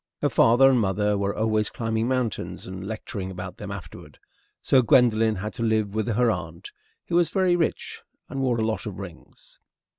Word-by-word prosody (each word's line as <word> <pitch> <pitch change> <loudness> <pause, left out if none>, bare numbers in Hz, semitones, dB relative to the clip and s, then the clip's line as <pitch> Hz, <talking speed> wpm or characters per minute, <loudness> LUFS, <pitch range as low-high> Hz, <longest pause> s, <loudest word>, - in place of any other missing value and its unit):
Her - - +3
father 120 +4 +5
and 130 - +3
mother 105 0 +1
were 100 0 -1
always 110 -1 +1
climbing 115 0 -2
mountains 125 -5 -2
and 95 +1 -7
lecturing 105 -3 -5
about 90 -1 -7
them 105 - -7
afterward, 100 -2 -9 0.4
so 130 - +4
Gwendolen 115 -2 +4
had 105 +3 -5
to - - -7
live 110 -3 0
with 110 0 -1
her 120 +1 +2
aunt, 85 -3 -6 0.3
who - - -3
was 175 -2 +3
very 185 -1 +2
rich 170 -2 -2 0.3
and 135 - -4
wore 125 -3 +1
a 110 - 0
lot 110 0 -2
of 100 - -6
rings. 90 -4 -12
110 Hz, 185 wpm, -25 LUFS, 100-120 Hz, 0.4 s, father